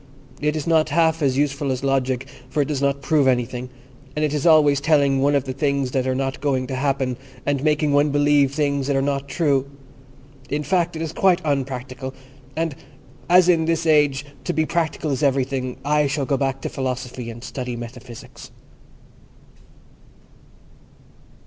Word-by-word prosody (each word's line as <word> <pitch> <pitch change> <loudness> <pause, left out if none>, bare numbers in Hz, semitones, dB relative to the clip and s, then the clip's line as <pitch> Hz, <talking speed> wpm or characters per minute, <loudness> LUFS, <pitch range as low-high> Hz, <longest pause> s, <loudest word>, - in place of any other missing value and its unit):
"It 150 +1 0
is 155 - -3
not 160 -2 +3
half 160 +1 +2
as 135 -2 +1
useful 140 -1 0
as 130 0 -3
Logic, 135 -1 0 0.2
for 150 +1 +1
it - - -7
does 145 -3 -2
not 140 0 0
prove 145 0 +3
anything, 125 0 0 0.5
and 155 0 +1
it 150 - -2
is 150 +2 0
always 150 -3 +5
telling 140 -2 +3
one 145 +2 +3
of 140 - +2
things 140 0 -1
that 130 -1 0
are 130 - 0
not 135 0 -2
going 135 -3 0
to 130 - -4
happen, 135 -2 -1 0.3
and 140 -1 0
making 150 -1 +2
one 145 +1 +4
believe 145 -1 +3
things 140 -2 0
that 140 - +1
are 135 - +2
not 140 0 -1
true. 140 -4 0 0.8
In 150 +1 -1
fact, 175 0 0
it 160 - -3
is 160 -1 -5
quite 185 -1 +3
unpractical, 130 -2 -3 0.4
and, 165 -1 -1 0.6
as 180 0 +6
in 165 -3 +3
this 165 0 0
age 145 -3 +3 0.2
to 175 - -2
be 160 -1 +1
practical 160 -2 -1
is 135 - -2
everything, 135 -2 0
I 150 0 +2
shall 140 0 -1
go 140 - +1
back 135 -1 -1
to - - -3
Philosophy 125 -2 -4
and 115 +1 -9
study 125 -2 -5
Metaphysics." 120 0 -10
140 Hz, 175 wpm, -22 LUFS, 130-150 Hz, 0.8 s, as